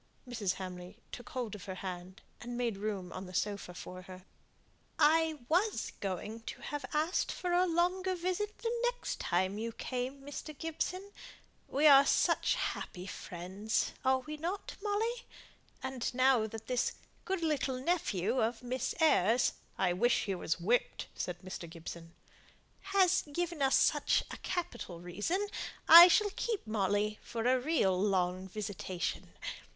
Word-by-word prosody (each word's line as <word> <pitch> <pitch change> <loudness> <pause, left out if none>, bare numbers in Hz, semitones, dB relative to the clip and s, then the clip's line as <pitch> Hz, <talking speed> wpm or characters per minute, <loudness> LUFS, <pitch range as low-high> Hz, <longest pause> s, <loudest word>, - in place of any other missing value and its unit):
Mrs. 220 -7 -1
Hamley 180 -1 -7
took 245 -4 -8
hold 245 -5 -4
of 200 -1 -8
her 190 -2 -5
hand, 185 +1 -7 0.2
and 240 0 -6
made 240 -3 0
room 200 -3 -4
on 185 0 -6
the 180 - -9
sofa 200 -4 -2
for 185 0 -8
her. 185 0 -12 0.7
"I 315 -1 +3
was 375 +8 +1
going 200 +3 -4
to - - -6
have 290 -2 -4
asked 315 +4 +1
for 360 - -3
a 360 +1 +4
longer 365 +2 +1
visit 370 +4 -2
the 465 0 -2
next - - -2
time 190 +4 0
you 230 +1 -3
came, 255 +4 -4
Mr. 290 +1 -7
Gibson. 365 +5 -3 0.6
We 285 +3 +1
are 280 -2 +9
such - - +2
happy 180 0 -4
friends, 190 +3 -3
are 260 0 +2
not 330 +6 -4
we, - - -19
Molly? 450 +4 -1 0.6
and 260 -2 -2
now, 255 -3 +4
that 225 0 -8
this 250 -1 0 0.3
good 375 -3 -2
little 280 -5 0
nephew 255 - 0
of 225 +2 -1
Miss 255 +1 -2
Eyre's 245 - +4
" - - -34
"I 175 - +2
wish 235 +7 +2
he 200 - -1
was 175 -2 -2
whipped," 230 +8 0
said 175 -1 -4
Mr. 185 -2 -7
Gibson. 165 0 -9 0.4
" - - -34 0.2
has 375 -1 +5
given 345 0 -2
us 270 0 +4
such - - +3
a - - -6
capital 350 - -4
reason, 205 - -2 0.4
I 340 +2 +12
shall 410 +3 +3
keep 450 -4 -2
Molly 210 0 0
for 230 -1 -4
a 255 +1 +4
real 250 - +2
long 185 -2 +1
visitation. 190 -3 -4
245 Hz, 155 wpm, -33 LUFS, -, 0.7 s, I